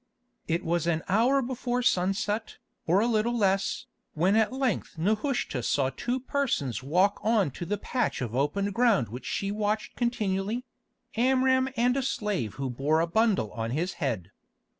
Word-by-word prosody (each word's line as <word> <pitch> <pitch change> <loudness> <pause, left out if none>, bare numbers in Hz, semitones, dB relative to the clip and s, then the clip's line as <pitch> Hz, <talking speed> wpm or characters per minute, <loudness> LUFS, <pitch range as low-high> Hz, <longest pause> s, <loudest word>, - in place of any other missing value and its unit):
It 170 +2 -1
was 170 0 0
an 160 -1 0
hour 245 +8 +3
before 245 0 -2
sunset, 205 +2 0 0.3
or 180 +5 +4
a - - +2
little 235 +1 +1
less, 195 -2 +1 0.3
when 180 +6 +3
at 220 0 +3
length 260 -10 -2
Nehushta 215 - 0
saw 135 +2 +1
two 245 - -2
persons 245 - -1
walk 180 +9 +2
on 215 -8 +2
to 170 +6 -6
the 205 +3 -1
patch 245 +4 -1
of 120 -4 -4
open 195 +10 0
ground 225 - +3
which 125 +4 -7
she 200 0 -2
watched 210 +1 -2
continually—Amram 245 +4 0
and 245 +2 +3
a 275 - +1
slave 205 - -2
who 135 +1 -3
bore 140 +6 +1
a 165 - +3
bundle 195 - +1
on 115 -1 -3
his 165 +9 -1
head. 110 - -2
200 Hz, 160 wpm, -28 LUFS, 160-240 Hz, 0.3 s, or